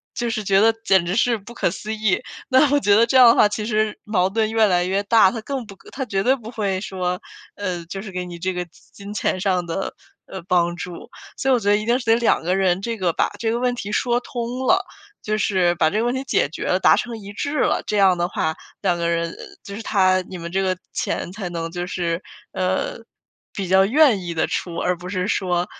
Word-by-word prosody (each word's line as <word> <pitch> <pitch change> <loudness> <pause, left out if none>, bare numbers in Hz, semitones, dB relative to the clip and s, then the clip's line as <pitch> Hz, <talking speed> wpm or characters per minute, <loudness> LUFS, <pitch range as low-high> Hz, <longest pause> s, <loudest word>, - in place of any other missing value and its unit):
就 240 -2 -1
是 220 -2 -2
觉 195 0 +3
得 225 +1 +5
简 190 -5 +3
直 180 - -1
是 235 0 +2
不 215 +4 -12
可 235 - 0
思 215 +2 -5
议。 215 0 +1 0.3
那 260 +2 +5
我 290 - +4
觉 205 -7 +3
得 230 +2 +5
这 235 - -2
样 250 - +9
的 230 - +5
话 210 - +6
其 210 +1 -4
实 215 -1 0
矛 190 -3 +1
盾 220 +2 0
越 225 -1 +4
来 180 -2 +2
越 195 +2 0
大， 205 -1 +5
他 230 - -5
更 265 +1 -4
不 200 -2 -12 0.2
他 270 - -3
绝 195 -4 -1
对 260 +3 +4
不 225 -3 -10
会 200 -5 -1
说， 180 -2 -3 0.3
呃， 180 -4 -4
就 195 +3 -6
是 210 - -8
给 180 0 -4
你 175 -1 -8
这 185 +2 -2
个 180 0 -3 0.3
金 200 +1 -9
钱 200 - -1
上 185 -2 0
的， 170 +3 -3 0.3
呃， 190 - -7
帮 175 -1 +2
助。 180 -1 -8 0.3
所 270 - -1
以 - - +5
我 245 - +3
觉 205 -1 -1
得 205 - +5
一 215 - -4
定 240 +2 +3
是 245 - -8
得 225 - +5
两 235 - +2
个 180 +2 +1
人 190 -1 +1
这 230 +1 -3
个 180 -3 +1
把 - - +1
这 225 - 0
个 235 - -1
问 250 0 +1
题 210 -3 -5
说 240 -1 +1
通 245 +1 -4
了， 370 +7 +3 0.4
就 215 0 -1
是 185 -5 +2
把 160 -2 +3
这 210 - -1
个 - - +1
问 245 - +1
题 260 - -2
解 145 - +1
决 - - -6
了 185 - +1
达 - - +6
成 235 -2 -3
一 200 -1 -9
致 285 +8 -3
了， - - +1
这 210 - -1
样 190 -3 +5
的 175 - 0
话， 160 -2 -2 0.3
两 180 -3 +1
个 170 0 -1
人 170 0 -1 0.3
就 200 - -9
是 225 - -6
他 185 -4 +3
你 185 - -7
们 170 0 -7
这 195 +2 0
个 185 -1 0 0.2
钱 175 - -3
才 195 -2 -5
能 165 -1 -4
就 175 0 -4
是， 170 -1 -2 0.3
呃， - - -1 0.6
比 190 -3 -4
较 190 +1 +5
愿 260 -2 +4
意 170 -1 -4
地 160 - +1
出， 170 -2 -3
而 180 -1 0
不 180 +1 -9
是 185 0 -2
说 180 -3 0
200 Hz, 270 characters per minute, -22 LUFS, 180-225 Hz, 0.6 s, 样